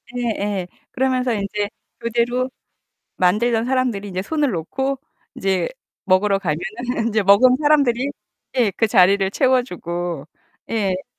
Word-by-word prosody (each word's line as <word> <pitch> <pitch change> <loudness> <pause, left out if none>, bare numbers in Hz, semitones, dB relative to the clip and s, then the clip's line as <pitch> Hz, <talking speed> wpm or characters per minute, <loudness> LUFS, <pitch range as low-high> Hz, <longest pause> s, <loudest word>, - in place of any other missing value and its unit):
예예. 205 -6 -2 0.2
그러면서 255 -1 +1
인제 205 0 -2 0.3
교대로 240 +2 0 0.7
만들던 225 +5 +2
사람들이 250 -6 0
이제 185 -1 -3
손을 295 +4 0
놓고 265 +10 -2 0.4
인제 190 -1 0 0.4
먹으러 195 +1 +3
가면은 220 +8 -3
인제 215 -2 +1
먹은 225 +6 +6
사람들이 280 -3 +3 0.5
예, 230 -5 +3
그 225 - +3
자리를 195 -2 +4
채워 255 +2 +3
주고. 175 - -5 0.4
예. 195 -4 -1
220 Hz, 270 characters per minute, -21 LUFS, 195-250 Hz, 0.7 s, 먹은